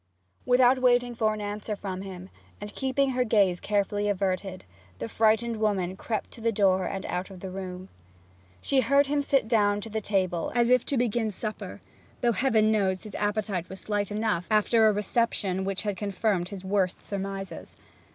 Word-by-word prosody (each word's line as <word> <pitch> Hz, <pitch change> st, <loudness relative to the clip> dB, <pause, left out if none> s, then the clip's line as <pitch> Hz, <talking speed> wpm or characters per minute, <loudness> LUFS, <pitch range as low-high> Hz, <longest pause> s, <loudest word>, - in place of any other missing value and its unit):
Without 250 Hz, +1 st, +5 dB
waiting 245 Hz, -1 st, +3 dB
for 220 Hz, -2 st, +1 dB
an 215 Hz, 0 st, -4 dB
answer 210 Hz, +1 st, -4 dB
from 190 Hz, -2 st, -5 dB
him, 190 Hz, -1 st, -8 dB, 0.3 s
and 205 Hz, 0 st, -7 dB
keeping 265 Hz, 0 st, 0 dB
her 250 Hz, 0 st, +1 dB
gaze 200 Hz, -6 st, +3 dB
carefully 205 Hz, 0 st, 0 dB
averted, 190 Hz, -1 st, -2 dB, 0.3 s
the 115 Hz, -, -4 dB
frightened 225 Hz, -, +2 dB
woman 195 Hz, -4 st, 0 dB
crept 215 Hz, +2 st, -4 dB
to 230 Hz, -, -12 dB
the 230 Hz, +1 st, +1 dB
door 190 Hz, -3 st, +2 dB
and 195 Hz, -1 st, -4 dB
out 180 Hz, +2 st, -3 dB
of 190 Hz, -2 st, -11 dB
the 190 Hz, 0 st, -7 dB
room. 185 Hz, -1 st, -6 dB, 0.8 s
She 275 Hz, -, +2 dB
heard 280 Hz, +4 st, +4 dB
him 285 Hz, +1 st, 0 dB
sit 275 Hz, -4 st, +1 dB
down 205 Hz, -3 st, +2 dB
to 220 Hz, +1 st, -8 dB
the 220 Hz, 0 st, -2 dB
table, 185 Hz, -5 st, -1 dB
as 240 Hz, 0 st, +3 dB
if 250 Hz, -1 st, +5 dB
to 280 Hz, -, +1 dB
begin 235 Hz, -2 st, +1 dB
supper 215 Hz, +1 st, -6 dB, 0.4 s
though, 240 Hz, -, +3 dB
Heaven 220 Hz, -1 st, +3 dB
knows, 190 Hz, -3 st, +1 dB
his 215 Hz, -, -9 dB
appetite 205 Hz, -4 st, -2 dB
was 190 Hz, -, -7 dB
slight 205 Hz, -2 st, -2 dB
enough 210 Hz, -4 st, -1 dB
after 220 Hz, +1 st, +4 dB
a -, -, +5 dB
reception 205 Hz, -2 st, 0 dB
which 195 Hz, +1 st, -3 dB
had 205 Hz, -3 st, -2 dB
confirmed 200 Hz, -3 st, -1 dB
his 195 Hz, -2 st, -8 dB
worst 190 Hz, -2 st, 0 dB
surmises. 195 Hz, -1 st, -6 dB
205 Hz, 180 wpm, -27 LUFS, 190-230 Hz, 0.8 s, Without